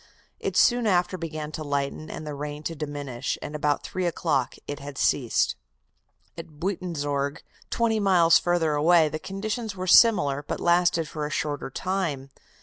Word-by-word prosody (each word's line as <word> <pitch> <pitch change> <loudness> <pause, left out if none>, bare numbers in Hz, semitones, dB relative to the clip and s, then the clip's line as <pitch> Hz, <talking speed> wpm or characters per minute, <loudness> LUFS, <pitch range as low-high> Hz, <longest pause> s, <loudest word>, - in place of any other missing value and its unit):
It - - -2
soon 240 -2 +4
after 180 -1 +2
began 155 -3 -5
to 155 - -5
lighten, 145 +2 -3
and 155 - -7
the 150 - -5
rain 145 +1 -6
to 165 - -3
diminish, 145 -4 -4
and 145 - -7
about 150 -1 0
three 185 -1 -2
o'clock 150 -6 0
it 145 - -5
had 140 -1 -9
ceased. 125 -5 +1 0.8
At 160 -3 -11
Buitenzorg, 150 -6 -2 0.3
twenty 225 -2 +1
miles 180 -5 +5
further 175 -3 +1
away, 160 +1 +4
the 155 - -4
conditions 215 +4 -4
were 185 0 -4
similar, 175 -9 +5
but 145 - -5
lasted 170 -2 +2
for 150 -1 -4
a - - -7
shorter 145 -2 -3
time. 155 -5 -3
155 Hz, 160 wpm, -26 LUFS, 145-180 Hz, 0.8 s, miles